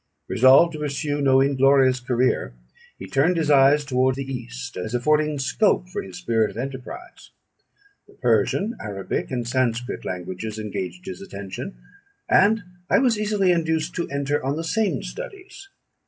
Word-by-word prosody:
Resolved 135 +7 +5
to 155 - -6
pursue 145 0 -2
no 135 -1 +4
inglorious 135 -1 +4
career, 120 - 0 0.4
he - - -8
turned 140 - +1
his 155 -2 +1
eyes 140 +1 +5
toward 130 -1 +1
the 135 - -4
East, 125 -1 -7
as 110 +6 -4
affording 150 +4 +1
scope 95 - +1
for - - -4
his 95 -2 -10
spirit 110 +3 +1
of - - -11
enterprise. 135 - -7 0.8
The - - -20
Persian, 215 +4 +1
Arabic, 100 -2 -4
and 120 -3 -3
Sanscrit 125 -1 -1
languages 95 +4 -5
engaged 90 -4 -5
his 90 - -7
attention, 100 - -7 0.5
and 205 +2 +4 0.3
I - - +5
was 240 -4 +2
easily 205 -3 +2
induced 160 -1 0
to 170 - -3
enter 140 0 -1
on 135 +2 -1
the 165 - -3
same 210 +5 0
studies. 395 -4 -9
135 Hz, 155 wpm, -23 LUFS, 115-160 Hz, 0.8 s, Resolved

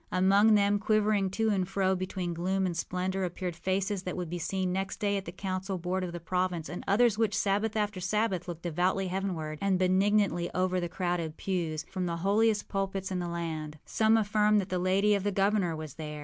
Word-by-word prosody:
Among 195 +4 +5
them, 205 0 +3
quivering 215 -2 +2
to 220 +3 0
and 190 -3 0
fro 190 -1 +1
between 185 -1 -3
gloom 190 +3 0
and 175 -2 -2
splendor, 185 +2 -2
appeared 180 -1 -3
faces 190 +3 -1
that 180 -1 -5
would 175 -3 -4
be 175 - -3
seen 185 +1 -1
next 195 +1 -3
day 205 -2 +1
at 195 -1 -3
the - - -6
council 190 +1 -3
board 180 +2 -2
of 180 - -3
the 175 - -6
province, 180 -1 -1
and 175 - -6
others 220 +1 +3
which, 220 -3 +1
Sabbath 205 +2 0
after 210 -2 -1
Sabbath, 190 -1 0
looked 170 -1 -6
devoutly 180 +3 0
heavenward, 175 -5 -3
and 195 -2 +2
benignantly 185 -1 +2
over 185 0 +1
the 175 -1 -3
crowded 175 -3 -2
pews, 170 -5 -2
from 185 -2 -2
the 170 -1 -2
holiest 210 +1 +2
pulpits 195 -1 -2
in 185 - -1
the 175 - -3
land. 160 -3 -4
Some 220 0 +3
affirm 210 0 +3
that 195 -2 0
the 180 - -1
lady 195 +3 +3
of 200 - +1
the 205 +1 0
governor 195 -3 +1
was 155 -3 -7
there. 150 -1 -6
185 Hz, 210 wpm, -29 LUFS, 175-200 Hz, -, Among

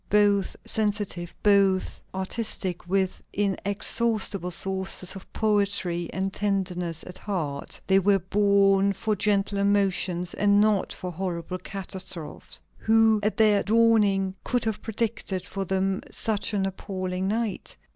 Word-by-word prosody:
Both 205 -1 +3
sensitive, 205 -5 -2
both 195 -2 +3
artistic, 190 -2 -3
with 190 -1 0
inexhaustible 200 0 0
sources 190 +1 +2
of 190 - -11
poetry 200 -5 0
and 190 0 -2
tenderness 180 -5 -2
at 180 - -8
heart, 155 -9 -4
they 195 0 +4
were 195 +1 +3
born 200 +1 +3
for 210 +3 -1
gentle 200 0 +1
emotions 190 -3 0
and 205 0 +3
not 210 -2 +2
for 180 -1 -6
horrible 180 0 -4
catastrophes. 185 -4 -7 0.2
Who, 220 -1 +4
at 210 +1 -1
their 210 -3 +4
dawning, 205 -4 +3
could 245 -2 -1
have 220 -2 -2
predicted 215 -4 -2
for 195 +1 -4
them 190 +1 0
such 215 -1 -2
an 195 -1 +1
appalling 185 -1 -3
night? 220 0 -3
195 Hz, 125 wpm, -26 LUFS, 185-205 Hz, 0.2 s, they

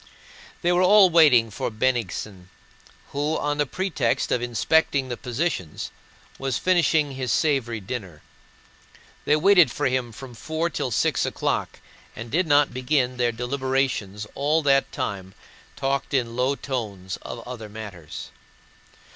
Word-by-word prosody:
They 175 - +3
were 175 +1 +3
all 190 0 +6
waiting 135 -9 +6
for - - -3
Bennigsen, 110 -5 -2 0.6
who 145 +3 -1
on 145 0 -2
the 145 - +2
pretext 155 -8 -1
of 120 - +1
inspecting 130 +3 +1
the 120 - -2
position 125 - -3 0.6
was 135 -2 -1
finishing 165 -5 +2
his 130 -3 -3
savory 120 -4 +1
dinner. 95 -7 -7 1.0
They 150 - +4
waited 175 -1 +6
for - - -3
him 130 -2 0
from 125 +3 -10
four 160 +7 -3
till 130 - -2
six 115 - +1
o'clock - - -2 0.3
and 115 +1 -8
did 175 +4 +1
not 145 -2 +4
begin 130 0 0
their 120 -1 +2
deliberations 125 -4 -2
all 150 +3 +1
that 135 -1 +3
time 100 -7 -4 0.4
but - - -15
talked 135 +1 -1
in 120 -3 0
low 130 +3 +1
tones 105 -10 -5
of 115 0 -8
other 115 -4 -7
matters. 100 -7 -8
130 Hz, 140 wpm, -24 LUFS, 115-145 Hz, 1.0 s, all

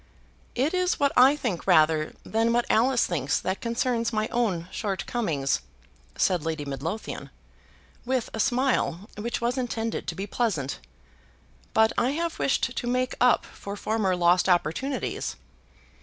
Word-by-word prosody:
"It 275 +7 +1
is 365 0 +1
what 280 -1 +3
I 260 +3 +7
think 240 - -3
rather 155 0 +4
than 225 +1 +1
what 240 0 +2
Alice 245 +2 +3
thinks 145 -5 0
that 190 +1 -3
concerns 235 -1 0
my 215 0 0
own 205 -9 0
shortcomings," 190 - -1 0.6
said 180 -5 +2
Lady 160 -2 -3
Midlothian, 150 +10 -5 0.7
with 255 -1 -1
a 220 - -4
smile 240 -6 +1
which 230 +3 -3
was 245 +3 0
intended 230 -2 -3
to - - -3
be 195 - -4
pleasant. 195 - -1 1.0
"But 220 0 +4
I 255 +3 +1
have 335 +2 -2
wished 260 -2 +1
to 240 - -3
make 250 +1 0
up 250 0 +4
for 200 0 -8
former 205 -3 0
lost 180 +1 +3
opportunities." 180 - 0
225 Hz, 140 wpm, -26 LUFS, 180-250 Hz, 1.0 s, I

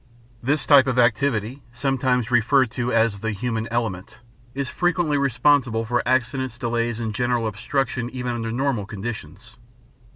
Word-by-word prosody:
This 140 +4 +1
type 140 -2 +6
of 125 -1 0
activity, 125 +1 +1
sometimes 125 -1 0
referred 125 +1 +3
to 125 +1 -2
as 115 -3 +2
the 110 - -2
"human 115 +1 -3
element," 110 -3 -3 0.4
is 140 -1 -2
frequently 175 -3 0
responsible 130 -3 +2
for 120 +2 0
accidents, 130 0 0
delays, 120 -1 -1
and 110 -2 -3
general 120 0 0
obstruction 120 +3 -2
even 125 -1 -4
under 115 -1 -3
normal 120 -4 -1
conditions. 110 +2 -7
120 Hz, 140 wpm, -23 LUFS, 115-130 Hz, 0.4 s, type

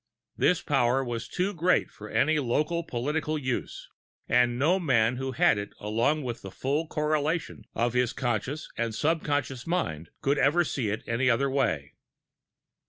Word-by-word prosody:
This - - +2
power 125 +3 +2
was 120 -2 -4
too 190 +3 -1
great 180 +1 +2
for 105 0 -10
any 155 +1 +2
local 150 +6 0
political 150 +4 -2
use, 130 -4 -3 0.4
and 120 0 +3
no 165 +9 +3
man 125 -7 +2
who 135 0 -3
had 110 -2 +4
it 100 - -6
along 115 +9 +1
with 120 -2 -4
the 95 - -7
full 145 - -1
correlation 155 +1 -1
of 120 +1 +1
his 125 -1 +2
conscious 130 +4 -2
and 115 -2 -2
subconscious 145 -4 -1
mind 80 - -2
could 140 +1 +1
ever 145 +6 +4
see 130 -9 -2
it 105 - -3
any 125 +2 +1
other 135 +3 +2
way. 80 - 0
130 Hz, 160 wpm, -28 LUFS, 120-155 Hz, 0.4 s, had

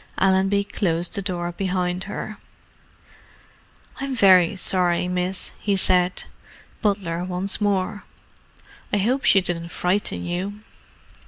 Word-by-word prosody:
Allenby 195 +1 +3
closed 175 -4 -1
the 200 - -1
door 175 -3 -3
behind 180 0 -2
her. 205 +1 -6 1.6
"I'm 275 -1 -3
very 190 -4 +5
sorry, 180 -2 +1
miss," 180 +1 -2
he 200 -1 0
said—butler 180 0 -1
once 185 +3 -1
more. 205 0 0 0.9
"I - - +2
hope 245 +7 0
she 195 - +6
didn't 170 -1 -3
frighten 180 +4 0
you." 190 +4 -4
185 Hz, 105 wpm, -23 LUFS, 180-200 Hz, 1.6 s, she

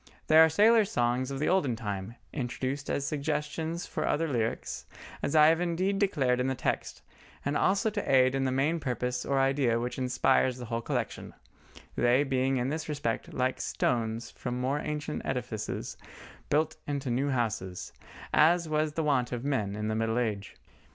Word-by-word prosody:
They 155 - +6
are 160 0 +8
sailors' 215 +5 +5
songs 120 +2 +1
of 135 - -4
the 150 - -1
olden 155 -10 +2
time, 105 -1 -5 0.2
introduced 135 +1 -3
as 140 - -1
suggestions 155 +3 -2
for - - -3
other 165 +2 +1
lyrics, 115 -6 -2 0.3
as 140 - -1
I 155 -1 +8
have 165 +2 +4
indeed 185 +3 0
declared 135 -11 +2
in 125 - +1
the 130 - 0
text, - - -3 0.4
and 140 +1 0
also 200 +7 +2
to 205 -6 -2
aid 130 -1 +5
in 135 0 0
the 130 - +1
main 145 +6 +1
purpose 125 -2 -2
or 135 -1 +2
idea 135 -3 +2
which 125 +2 -4
inspires 125 0 +2
the 125 - -7
whole 115 0 -2
collection—they 120 +2 -2
being 135 -1 +1
in 125 +1 0
this 155 +2 -4
respect 145 -7 -2
like 130 0 -1
stones 115 -1 -1
from 125 -1 -4
more 135 +3 0
ancient 150 0 -3
edifices 125 -5 -4 0.5
built 155 +2 +1
into 140 -3 -2
new 135 +4 0
houses, 105 -8 -2 0.4
as 170 +2 +4
was 155 0 0
the 160 - -1
wont 135 -5 +1
of 120 +1 -4
men 110 -9 -1
in 105 0 -3
the 110 - 0
middle 115 +1 0
age. 105 -5 -2
135 Hz, 175 wpm, -29 LUFS, 120-155 Hz, 0.5 s, are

